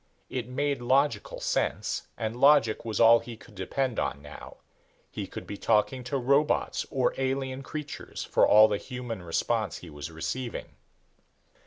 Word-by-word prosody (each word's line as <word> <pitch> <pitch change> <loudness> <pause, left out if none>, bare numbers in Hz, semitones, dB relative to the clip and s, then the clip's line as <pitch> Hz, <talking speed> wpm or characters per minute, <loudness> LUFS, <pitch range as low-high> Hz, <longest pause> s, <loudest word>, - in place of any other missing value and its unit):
It 125 -2 -3
made 140 +1 -1
logical 140 - +1
sense - - -1
and 110 0 -3
logic 135 -3 +4
was 110 -3 -3
all 115 0 +7
he 115 -1 -9
could 110 - -17
depend 115 +6 -2
on - - -2
now. 75 0 -11 0.5
He - - -5
could - - -8
be 100 - -7
talking 115 +5 +1
to 135 +3 -1
robots 140 +4 +1
or 130 -3 +1
alien 135 0 -1
creatures, 150 +1 -6
for - - +3
all 110 +1 +8
the 105 -1 -1
human 125 -4 -6
response 105 +6 -1
he 85 - -11
was 75 +1 -7
receiving. 85 +10 -4
120 Hz, 155 wpm, -28 LUFS, 110-135 Hz, 0.5 s, all